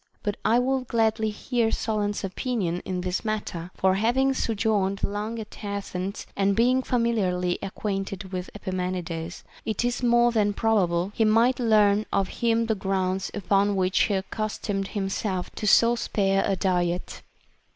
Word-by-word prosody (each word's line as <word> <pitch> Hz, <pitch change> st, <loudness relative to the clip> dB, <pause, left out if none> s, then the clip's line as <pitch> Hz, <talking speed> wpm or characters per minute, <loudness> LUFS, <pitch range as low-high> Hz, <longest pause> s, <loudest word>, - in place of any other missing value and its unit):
But 205 Hz, -1 st, -1 dB
I 225 Hz, +2 st, +4 dB
would 255 Hz, 0 st, 0 dB
gladly 220 Hz, -2 st, +1 dB
hear 230 Hz, +2 st, 0 dB
Solon's 210 Hz, -2 st, -1 dB
opin 230 Hz, +4 st, -2 dB
ion 175 Hz, +1 st, -1 dB
in 185 Hz, -1 st, -2 dB
this 180 Hz, 0 st, -2 dB
matter; 205 Hz, -6 st, -3 dB
for 190 Hz, 0 st, +3 dB
having 245 Hz, +7 st, +2 dB
sojourned 210 Hz, -5 st, 0 dB
long 210 Hz, +3 st, -2 dB
at 220 Hz, 0 st, -9 dB
Athens 200 Hz, -1 st, -4 dB
and 200 Hz, 0 st, +2 dB
being 250 Hz, +4 st, +3 dB
familiarly 200 Hz, -8 st, 0 dB
acquainted 195 Hz, -1 st, -4 dB
with 180 Hz, -1 st, -4 dB
Epimenides, 180 Hz, -3 st, -4 dB, 0.2 s
it 220 Hz, +2 st, -1 dB
is 245 Hz, +1 st, -1 dB
more 240 Hz, 0 st, +4 dB
than 210 Hz, -3 st, +2 dB
probable 195 Hz, -5 st, +1 dB
he 225 Hz, -, +1 dB
might 230 Hz, +4 st, +4 dB
learn 215 Hz, -3 st, +3 dB
of 195 Hz, -1 st, +1 dB
him 230 Hz, -1 st, +2 dB
the 225 Hz, -, +1 dB
grounds 190 Hz, -1 st, -1 dB
upon 200 Hz, 0 st, +2 dB
which 185 Hz, 0 st, +1 dB
he 205 Hz, -, 0 dB
accustomed 195 Hz, 0 st, -3 dB
himself 195 Hz, -2 st, -2 dB
to 210 Hz, -, -4 dB
so 230 Hz, +3 st, +6 dB
spare 195 Hz, -4 st, +1 dB
a 195 Hz, -, +1 dB
diet. 180 Hz, -2 st, -1 dB
205 Hz, 150 wpm, -26 LUFS, 190-225 Hz, 0.2 s, so